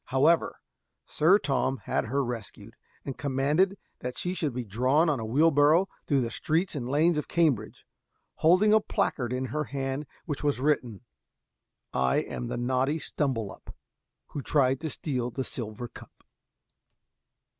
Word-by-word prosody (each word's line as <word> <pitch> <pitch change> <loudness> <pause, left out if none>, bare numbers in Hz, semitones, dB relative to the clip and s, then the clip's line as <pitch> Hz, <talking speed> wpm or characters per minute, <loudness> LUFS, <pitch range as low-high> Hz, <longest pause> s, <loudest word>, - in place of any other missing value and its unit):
However, 145 +6 +2 0.5
Sir 175 +6 +4
Tom 135 -6 0
had - - -1
her 135 +4 0
rescued, 115 -2 -7 0.3
and 135 - -6
commanded 145 +8 +1 0.2
that 125 0 -5
she 180 - -2
should 155 -6 -1
be 125 0 -4
drawn 130 - +2
on 145 -4 0
a 110 - -4
wheelbarrow 150 - +4 0.2
through 140 -3 +3
the 115 -1 -2
streets 165 +4 0
and 125 -5 -4
lanes 155 +3 +3
of - - -5
Cambridge, 140 -11 0 0.5
holding 185 +6 +5
a 220 - +7
placard 125 - -1
in 130 +1 -1
her 150 0 -1
hand 135 +1 -3
on - - -30
which 145 -4 -4
was 145 -3 +1
written 125 -7 0 0.9
"I 65 0 +2
am - - -2
the - - -3
naughty 130 +4 +1
Stumbelup, 130 -8 -3 0.5
Who 145 - -5
tried 135 -1 +2
to 160 - -3
steal 130 -4 -3
the 130 +2 -3
silver 120 -1 -6
cup." - - -15
135 Hz, 155 wpm, -28 LUFS, 125-155 Hz, 0.9 s, a